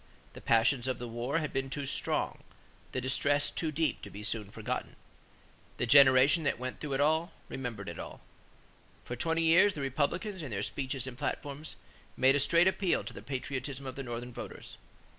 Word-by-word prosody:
The - - -11
passions 120 +2 +3
of 130 - -1
the 120 - -6
war 120 +6 -2
had 155 -3 -2
been 135 0 -1
too 145 +1 -4
strong; - - +2 0.5
the - - -2
distress 140 +3 +1
too 160 -2 -2
deep 155 +1 0
to 105 - -8
be 100 +1 -9
soon 105 -1 -2
forgotten. - - -4 0.8
The - - 0
generation 135 +4 +7
that 145 - +1
went 125 +1 -5
through 145 -2 -4
it 135 - 0
all 160 +4 +2 0.2
remembered 115 -7 -5
it 85 -2 -6
all. - - -8 0.9
For 120 - -4
twenty 165 +6 +1
years, 185 +5 +5
the 145 - -4
Republicans, 155 - -1
in 145 - -6
their 100 -3 -2
speeches 135 0 -3
and 130 -1 -8
platforms, 145 +1 -4 0.4
made 135 +1 +5
"a - - +3
straight 170 +5 +4
appeal 190 -1 +1
to - - -7
the - - -9
patriotism 135 0 -4
of 130 -1 -6
the 135 - -5
Northern 120 -1 -6
voters." - - -9
135 Hz, 190 wpm, -31 LUFS, 125-150 Hz, 0.9 s, generation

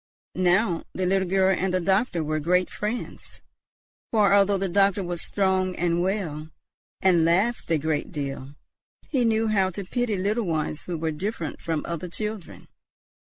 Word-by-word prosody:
Now 180 0 +2
the 185 - -1
little 190 0 +1
girl 190 +1 +3
and 190 +1 -1
the 185 - +1
doctor 190 -1 +1
were 155 0 -1
great 180 +4 +1
friends; 215 +4 -5 0.7
for 210 -3 +4
although 200 0 +4
the 195 0 -1
doctor 195 +1 +2
was 175 -1 -3
strong 190 -2 0
and 175 0 0
well, 175 -5 -2 0.5
and 180 -3 +4
laughed 190 +9 +1
a 165 - +3
great 155 +3 -2
deal, 140 -3 -5 0.5
he 265 -5 +1
knew 225 -1 +2
how 195 -3 +2
to 190 +2 -6
pity 240 +2 -1
little 205 +3 0
ones 155 -2 -2
who 175 -2 -3
were 160 0 -1
different 170 0 -4
from 160 -2 -2
other 170 +1 -4
children. 210 0 -5
185 Hz, 160 wpm, -25 LUFS, 165-200 Hz, 0.7 s, for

